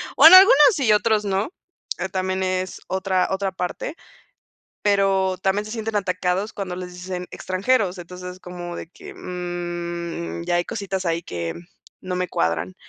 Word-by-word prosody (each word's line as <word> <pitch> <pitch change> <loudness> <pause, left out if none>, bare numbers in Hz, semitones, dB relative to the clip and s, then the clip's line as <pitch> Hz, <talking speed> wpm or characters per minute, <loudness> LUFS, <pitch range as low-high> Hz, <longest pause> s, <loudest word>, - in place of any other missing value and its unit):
o - - +9
en 335 - +10
algunos 425 +3 +8
sí 275 -6 0
y 215 - +6
otros 210 0 +2
no, 195 +6 0 0.6
también 185 0 -1
es 185 0 -2
otra 190 -1 0
otra 190 0 -1
parte. 185 - -4 0.9
Pero 195 -2 +2
también 195 +2 +1
se 215 - -7
sienten 225 -2 -3
atacados 185 +1 -1
cuando 185 -3 -4
les 180 -1 -7
dicen 180 0 -5
extranjeros, 190 0 0
entonces 180 +1 -8
es 185 - -17
como 175 -1 -7
de - - -7
que, 390 - -12
mm, 175 - -5
ya - - 0
hay 175 0 +2
cositas 190 0 -4
ahí 170 -1 0
que 85 - -4 0.5
no 185 -1 -4
me 180 0 -1
cuadran. 85 +2 -1
185 Hz, 165 wpm, -23 LUFS, 180-200 Hz, 0.9 s, en